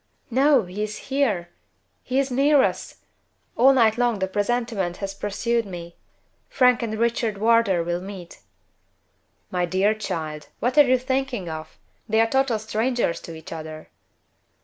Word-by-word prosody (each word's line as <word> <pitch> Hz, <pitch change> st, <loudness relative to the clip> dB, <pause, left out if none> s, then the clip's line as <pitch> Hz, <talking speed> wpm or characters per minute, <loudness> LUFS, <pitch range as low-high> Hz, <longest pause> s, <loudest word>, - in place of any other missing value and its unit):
"No! 270 Hz, 0 st, +4 dB
He 185 Hz, +3 st, -6 dB
is 215 Hz, 0 st, -3 dB, 0.2 s
here! 210 Hz, -12 st, +1 dB, 0.5 s
He 255 Hz, -, -3 dB
is 270 Hz, -1 st, +1 dB
near 275 Hz, +2 st, +4 dB
us! -, -, -3 dB, 0.5 s
All 260 Hz, +3 st, +6 dB
night 230 Hz, -3 st, +3 dB
long 240 Hz, -3 st, +2 dB
the 190 Hz, -1 st, -1 dB
presentiment 205 Hz, -3 st, -1 dB
has 195 Hz, -1 st, -4 dB
pursued 230 Hz, +4 st, -1 dB
me 175 Hz, -4 st, -9 dB, 0.5 s
Frank 250 Hz, -2 st, +3 dB
and 220 Hz, -2 st, -3 dB
Richard 230 Hz, -2 st, 0 dB
Wardour 220 Hz, -5 st, +3 dB
will 175 Hz, +1 st, -2 dB
meet." 190 Hz, -3 st, -9 dB, 1.1 s
"My 180 Hz, -1 st, 0 dB
dear 190 Hz, +4 st, +2 dB
child! 155 Hz, -8 st, -5 dB
what 245 Hz, +4 st, 0 dB
are 290 Hz, -, +7 dB
you 255 Hz, +1 st, +4 dB
thinking 260 Hz, -5 st, -2 dB
of? 155 Hz, 0 st, -8 dB, 0.3 s
They 220 Hz, +1 st, +2 dB
are 225 Hz, -, +5 dB
total 265 Hz, -1 st, +1 dB
strangers 220 Hz, -4 st, -1 dB
to 165 Hz, -, -9 dB
each 160 Hz, +1 st, -9 dB
other." 155 Hz, -1 st, -8 dB
220 Hz, 150 wpm, -23 LUFS, 180-245 Hz, 1.1 s, are